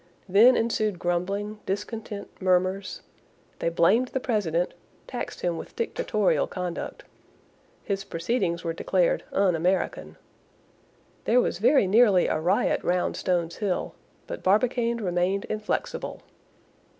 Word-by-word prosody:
Then 215 +7 +6
ensued 215 -4 0
grumbling, 195 +5 -2
discontent, 205 +1 -4
murmurs; 185 +1 +1 0.6
they - - +1
blamed 190 +9 +3
the 265 - -2
president, 180 -9 0 0.3
taxed 245 -2 -6
him 175 -2 -1
with - - -9
dictatorial - - 0
conduct. 180 - -5 0.8
His 195 -1 -2
proceedings 170 -1 -1
were 165 -1 -2
declared 180 +1 +1
"un 190 -3 +2
American." 180 +4 -1 1.1
There 245 - +4
was 245 - 0
very 245 +2 +4
nearly 200 -2 +5
a - - 0
riot 180 +6 +1
round 180 0 0
Stones 170 -2 -1
Hill; 200 -4 -2 0.3
but - - -6
Barbicane 235 +4 +2
remained 185 -1 0
inflexible. 215 0 -3
195 Hz, 115 wpm, -26 LUFS, 175-225 Hz, 1.1 s, Then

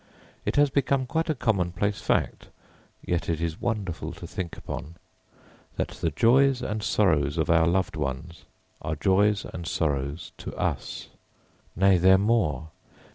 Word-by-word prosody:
It - - -1
has 145 -1 +4
become 135 -1 +1
quite 160 +5 -1
a 155 - +1
commonplace 100 -4 0
fact, - - 0 0.6
yet 85 -1 -1
it 80 -2 0
is 85 +1 -3
wonderful 105 -7 -3
to - - -9
think 90 -3 -5
upon, 80 - -7 0.8
that - - -1
the 85 - -2
joys 125 - +3
and 105 +1 -2
sorrows 80 -10 +2
of 80 0 +1
our 80 0 +4
loved 90 +2 +1
ones 75 +3 -5 0.4
are 75 +1 -2
joys 100 +5 +2
and 85 -1 -7
sorrows 70 -1 -2
to - - -7
us - - -3 0.7
nay 95 0 +4
they 95 +2 +6
are - - +7
more. 95 - +1
90 Hz, 150 wpm, -26 LUFS, 80-110 Hz, 0.8 s, are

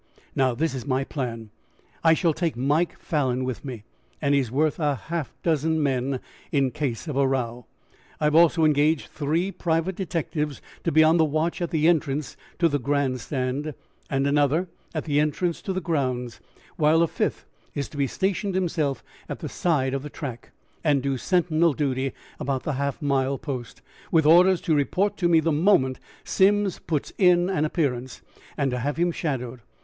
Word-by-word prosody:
Now, 130 -2 +2
this 160 +4 0
is 130 0 -6
my 130 0 +1
plan. 115 -6 -5 0.5
I 165 0 +6
shall 165 -1 +2
take 160 -5 -2
Mike 150 +7 +1
Falan 130 -5 0
with 130 -2 -4
me, 125 -7 -7 0.4
and 145 -1 +1
he 140 - +4
is 125 - -4
worth 150 +5 +1
half 145 -1 -2 0.2
a - - -37
dozen 160 -1 +1
men 130 -1 0 0.3
in 140 -2 +3
the 130 - 0
case 145 -1 -3
of 150 - -3
a 135 0 +3
row. 120 -3 -2 0.5
I - - -4
have 150 0 +3
also 165 0 +5
engaged 150 0 +2
three 160 +6 -1
private 170 0 -1
detectives 155 -5 -2 0.3
to 165 - +2
be 155 +1 +6
on 160 +2 +5
the 160 - +5
watch 155 +4 0
at 170 - -1
the 160 -1 +2
entrance 150 -4 +1 0.2
to 170 - +4
the 145 -2 0
Grand 135 -1 0
Stand, 135 +3 -3 0.3
and 135 0 0
another 145 +5 +2 0.3
at 155 - -2
the 145 -2 +1
entrance 160 +3 0
to 195 - -3
the 185 - -1
grounds, 130 -8 -2 0.4
while 160 +1 +4
a - - +2
fifth - - -2 0.3
is 140 - -2
to 145 -3 -1
station 195 +4 -1
himself 160 -7 -1 0.3
at - - -4
the - - -6
side 140 -7 0
of 135 - -1
the 150 - -7
track, 130 -6 -7 0.3
and 145 -4 +2
do 140 -1 0
sentinel 170 +1 +2
duty 135 -2 -1 0.3
about 135 -1 -2
the 150 - -2
half 140 +1 -2
mile 135 -1 +1
post, 130 -6 -6 0.3
with 160 -2 +4
orders 175 +3 +6
to 160 - +1
report 180 +8 +1
to 175 - +2
me 165 -1 +5
the 160 +1 +1
moment 150 -5 +3 0.2
Simms 200 0 +2
puts 155 -4 -3
in 180 -1 +4
an 155 -5 +1
appearance, 130 -6 -2 0.3
and 140 -2 +1
to 125 - -2
have 145 +5 -2
him 175 +1 +2
shadowed. 130 -7 -3
150 Hz, 185 wpm, -25 LUFS, 135-165 Hz, 0.5 s, I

